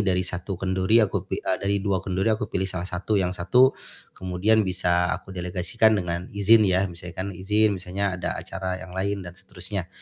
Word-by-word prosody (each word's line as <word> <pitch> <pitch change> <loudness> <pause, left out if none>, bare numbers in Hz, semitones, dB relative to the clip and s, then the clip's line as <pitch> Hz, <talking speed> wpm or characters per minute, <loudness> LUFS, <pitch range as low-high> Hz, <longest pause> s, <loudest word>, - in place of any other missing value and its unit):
dari 95 -2 +1
satu 90 +1 -4
kendori, 95 +3 +2
aku 100 -3 0
pi - - -2
eee, 95 - 0
dari 100 +1 +1
dua 95 -2 0
kendori 95 +2 0
aku 110 -1 +1
pilih 95 0 0
salah 90 -1 -4
satu 95 +4 -1
yang 90 -1 0
satu 125 +9 +4 0.4
kemudian 95 +4 +2
bisa 90 -2 +1
aku 95 - -12
delegasikan 95 +5 +1
dengan 90 -1 -3
izin 100 +3 +5
ya, 95 +1 +2
misalkan 90 +2 -6
izin, 105 +3 +2
misalnya 95 +1 -2
ada - - -2
acara 95 -1 -4
yang 95 -1 -10
lain 95 +1 -2
dan 90 - -8
seterusnya. 95 0 -4
95 Hz, 185 wpm, -25 LUFS, 90-100 Hz, 0.4 s, izin